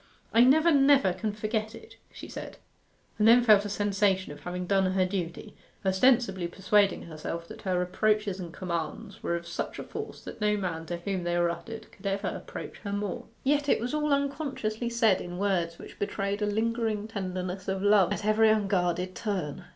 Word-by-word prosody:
'I 235 +2 +7
never, 315 +6 +5
never 275 - +5
can 215 +3 -2
forget 215 +1 -3
it!' 445 - -13 0.2
she - - -9
said, - - -8 0.6
and 210 - +5
then 240 +2 +7
felt 210 -3 +6
a - - -3
sensation 200 -3 +1
of 145 - -9
having 180 +3 -4
done 190 0 +2
her 185 -1 +3
duty, 185 +2 -4 0.3
ostensibly 195 -2 +3
persuading 195 +2 +2
herself 165 +1 -6
that - - -10
her 185 -2 0
reproaches 205 +2 +1
and 175 -2 -6
commands 170 -3 -5
were 170 - -1
of 170 0 -5
such 170 - -4
a - - -5
force - - -7
that - - -9
no 210 0 +2
man 165 -4 -3
to 175 - -3
whom 185 +1 -3
they 175 0 0
were 175 0 +2
uttered 220 +7 -8
could 200 0 -8
ever 195 0 -1
approach - - -7
her 200 - -5
more. 205 -1 -3 0.2
Yet 290 +1 +2
it - - +4
was 240 +5 -3
all 300 -1 0
unconsciously 275 -5 -1
said 225 -5 +3
in 175 0 -6
words 180 -4 0
which - - -12
betrayed 200 0 -2
a 210 - +1
lingering 220 0 -1
tenderness 185 -2 -4
of 190 0 -2
love 205 -3 +5
at - - -2
every 215 +1 +4
unguarded 185 -4 +1
turn. 185 -10 -3
200 Hz, 190 wpm, -28 LUFS, 180-220 Hz, 0.6 s, I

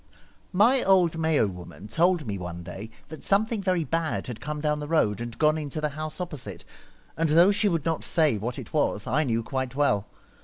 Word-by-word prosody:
My 235 +8 +4
old 185 -4 +3
Mayo 160 -6 +3
woman 90 +1 -8
told 170 - +2
me 105 -3 -3
one 85 -1 -6
day 100 +6 -8 0.2
that 155 - -9
something 215 +2 +1
very 185 -3 +1
bad 165 0 -1
had 120 -3 -7
come 150 +2 -4
down 150 0 0
the 150 - -5
road 115 - +1
and 120 -1 -6
gone 155 0 +3
into 150 0 -5
the 150 0 -1
house 155 +3 -6
opposite, 165 -7 -6 0.5
and 165 0 0
though 170 +6 +6
she 205 +1 +2
would 165 -5 -1
not 165 -1 -1
say 155 -10 +2
what 120 +4 -4
it - - -9
was, 145 -9 0
I 150 +7 +1
knew 115 -4 -1
quite 130 0 -3
well. 105 -8 +2
150 Hz, 205 wpm, -26 LUFS, 120-165 Hz, 0.5 s, though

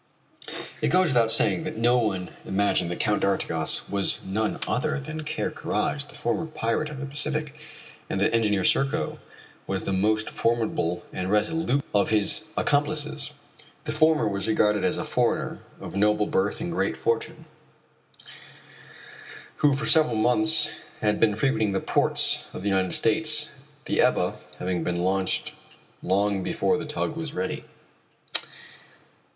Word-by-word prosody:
It - - +1
goes 185 -1 +2
without 115 -4 +2
saying 160 - +2
that 155 0 -6
no 120 +2 +3
one 95 -6 -2
imagined 95 -3 0
that 90 - -5
Count 105 0 0
d'Artigas 80 -5 +1
was 100 -1 +3
none 105 +3 -2
other 155 +4 -1
than 155 +3 -7
Ker 150 - -3
Karraje, 145 0 -2
the - - -11
former 160 +8 -2
pirate 150 0 -2
of 145 -2 -8
the 140 - -5
Pacific, 150 +1 +1 0.5
and 95 - -2
that 100 - +1
Engineer 105 -4 +1
Serko 135 +8 +1 0.5
was - - -3
the 95 - -2
most 105 +3 0
formidable 110 -7 -1
and 90 0 -4
resolute 140 +5 0
of 100 -1 +2
his 110 +7 +4 0.2
accomplices. 150 0 +1 0.5
The 150 - -4
former 155 -3 +2
was 100 0 -2
regarded 105 -1 +1
as - - +2
a - - -2
foreigner - - -1 0.2
of - - -9
noble 105 +1 +2
birth 100 +1 -1
and 175 - -4
great 165 - -2
fortune, 460 0 -3 2.1
who 145 -2 +2
for 140 - -4
several 155 -7 +5
months 155 +7 +4 0.3
had 105 -1 0
been 105 -2 +2
frequenting 110 -4 0
the 95 - 0
ports - - +3
of - - -8
the 100 - 0
United 95 -2 +3
States, 150 +5 +4 0.3
the - - +1
Ebba - - +1 0.2
having 90 -2 -3
been 90 +1 -2
launched 95 +1 0 0.5
long 100 +1 0
before 100 +8 -1
the - - -6
tug 150 +1 -2
was 160 -2 -6
ready. 95 +1 -4
115 Hz, 150 wpm, -25 LUFS, 100-150 Hz, 2.1 s, several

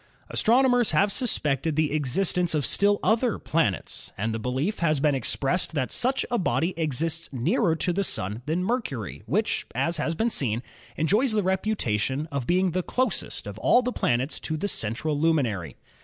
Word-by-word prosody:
Astronomers 245 -2 +3
have 200 +6 +3
suspected 155 - 0
the 155 -2 +1
existence 160 +4 0
of 145 -3 +1
still 205 0 +2
other 230 +1 +2
planets, 150 - -2
and 110 +3 -1
the 110 - -3
belief 130 - -2
has 155 -4 +2
been 145 +1 +2
expressed 140 +6 0
that 130 -4 -1
such 265 +2 +1
a 240 - +1
body 180 -1 0
exists 165 +2 -1
nearer 165 - +1
to 175 +2 0
the 200 +3 0
Sun 105 - -1
than 165 +4 0
Mercury, 130 - -3
which, 210 - 0
as 170 0 0
has 160 +2 -1
been 230 +7 0
seen, 120 - 0 0.3
enjoys 210 - +2
the 210 -2 +1
reputation 155 - 0
of 140 -4 -3
being 185 +1 +2
the 185 +2 0
closest 250 +3 -2
of 100 +1 -7
all 245 - +4
the 250 +1 -2
planets 125 +5 0
to 155 - -3
the 200 - -2
central 145 - -2
luminary. 130 - 0
160 Hz, 170 wpm, -26 LUFS, 135-200 Hz, 0.3 s, all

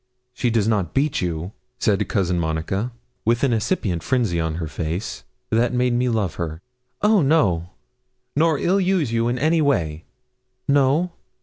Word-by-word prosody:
'She 125 0 0
does 110 -2 +1
not 100 -7 0
beat 145 +3 +1
you?' 85 +1 -3 0.3
said 105 -5 +1
Cousin 90 -4 +1
Monica, 85 +8 -2 0.3
with 120 +3 +1
an 135 -3 +3
incipient 105 - 0
frenzy 115 -7 0
in 80 -1 -1
her 85 -1 -3
face 80 - -4 0.3
that 120 +2 +2
made 125 0 +2
me 125 +1 +1
love 105 -8 -1
her. 80 -1 -3 0.4
'Oh 210 -2 +5
no!' 100 - +2 0.7
'Nor 160 +1 +3
ill 185 +7 +2
use 180 -9 +1
you 115 0 +1
in 120 +1 0
any 160 +5 +2
way?' 85 - 0 0.6
'No.' 140 +5 +3
115 Hz, 160 wpm, -22 LUFS, 85-140 Hz, 0.7 s, Oh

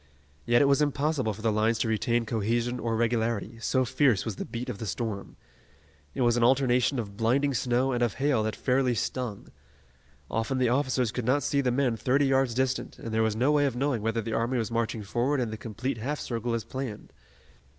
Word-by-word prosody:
Yet 120 +3 +5
it - - +4
was 140 +1 +3
impossible 145 -4 0
for 110 +1 -9
the 115 - +2
lines 110 +2 +2
to 115 - 0
retain 115 +2 +1
cohesion 115 +3 -1
or 115 0 -1
regularity, 115 -1 -1
so 130 +3 +1
fierce 125 -6 +2
was 110 -4 -4
the - - -4
beat 120 +2 -5
of 115 -6 -5
the 110 - -4
storm. 105 0 -4 0.8
It - - -2
was 120 -1 +3
an 120 - +2
alternation 125 +1 +3
of 100 -4 -4
blinding 135 +5 +2
snow 125 +2 +1
and 120 -1 -1
of 120 -4 +1
hail 135 -4 +1
that 110 0 -2
fairly 125 -1 +1
stung. 115 -1 -3 0.8
Often 115 +4 -1
the 125 -2 +2
officers 130 -2 +1
could 125 -1 -4
not 135 +4 +2
see 140 - +1
the 130 - +1
men 125 -2 +1
thirty 130 +6 +2
yards 135 -3 +2
distant, 130 0 -1
and 115 - -6
there 110 - +2
was 110 -1 +1
no 130 +6 +2
way 145 -1 +3
of 130 - -3
knowing 135 -3 0
whether 115 +1 0
the 115 +1 -4
army 120 +3 0
was 115 0 -2
marching 115 -1 -1
forward 125 +7 0
in 120 -3 -1
the - - -4
complete 115 +3 -4
half 145 +6 -3
circle 115 0 -2
as 115 - -3
planned. 125 -2 -6
120 Hz, 215 wpm, -28 LUFS, 115-130 Hz, 0.8 s, Yet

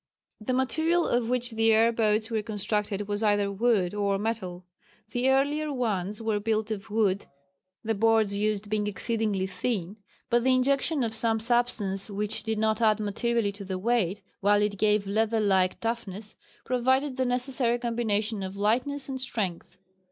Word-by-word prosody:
The 240 +4 -2
material 320 +6 +1
of 240 -1 0
which 245 -1 -1
the 225 0 +3
air 225 +1 +5
boats 220 0 +1
were 220 -1 0
constructed 210 -1 -2
was 205 0 -2
either 205 -2 +2
wood 200 -3 +1
or 200 -1 0
metal. 195 -4 -4 0.5
The 250 +1 +1
earlier 290 +3 +1
ones 210 -6 -2
were 220 -2 0
built 220 0 -1
of 215 0 -5
wood 205 -2 +1 0.6
the 225 0 0
boards 220 -1 +2
used 210 0 -1
being 210 0 -1
exceedingly 210 -2 -1
thin, 195 -1 -3 0.3
but 240 -1 +2
the 260 0 +4
injection 275 +2 +1
of 225 -1 -2
some 225 0 +2
substance 225 -4 0
which 205 +1 -1
did 220 -1 -2
not 220 +1 +1
add 215 -1 +4
materially 215 +1 0
to 200 0 -9
the 190 -1 -4
weight 210 -2 0 0.2
while 205 +1 +3
it 200 -2 -2
gave 210 -1 +2
leather 220 +3 +1
like 190 -3 +2
toughness, 220 -3 -4 0.3
provided 260 +2 +1
the 260 - +1
necessary 250 -1 0
combination 225 -3 -1
of 190 +1 -5
lightness 255 +7 0
and 265 -1 -4
strength. 210 -9 -4
220 Hz, 165 wpm, -27 LUFS, 205-240 Hz, 0.6 s, air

